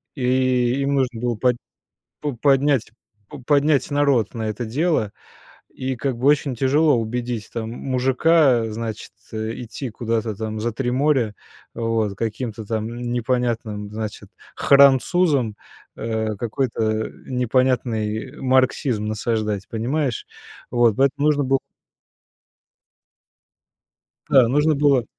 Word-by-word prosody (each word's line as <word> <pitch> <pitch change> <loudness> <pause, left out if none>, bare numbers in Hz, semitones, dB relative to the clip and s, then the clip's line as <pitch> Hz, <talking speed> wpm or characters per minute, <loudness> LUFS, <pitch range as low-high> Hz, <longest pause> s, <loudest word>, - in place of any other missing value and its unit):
и 130 0 +1
им 140 +1 0
нужно 125 -4 -1
было 120 -1 0
под 125 +3 +2 0.6
по 145 -2 -3
поднять 135 -1 +2 0.4
по 145 - -9
поднять 145 +2 +2
народ 140 -7 +2
на 110 -2 -3
это 110 +3 -4
дело. 130 - 0 0.6
И 130 0 -3
как 125 0 -2
бы 130 - 0
очень 145 -2 +3
тяжело 140 +3 +3
убедить 120 0 -3
там 115 -1 -4
мужика, 130 +1 +2
значит, 110 -1 -5 0.2
э, 110 +1 -3
идти 125 +3 -6
куда-то 110 -1 -2
там 110 +1 -4
за 115 0 -2
3 125 0 -2
моря, 130 -4 +1 0.4
вот, 115 -3 -1
к 100 - -19
каким-то 115 -1 -4
там 110 0 -2
н 120 +1 -5
непонятным, 120 -4 -1
значит, 110 0 -6 0.3
французам 140 - +4 0.4
э, 110 -1 -2
какой-то 110 -2 -1 0.2
непонятный 125 -1 0
марксизм 130 -3 +1
насаждать. 110 -2 -2
Понимаешь? 125 +3 -2 0.5
Вот, 120 -3 +3
поэтому 140 +2 +2
нужно 145 -2 +2
было 135 0 +2 2.7
да, 130 -4 +6
нужно 150 +5 +2
было 140 -4 +3
125 Hz, 120 wpm, -22 LUFS, 110-135 Hz, 2.7 s, да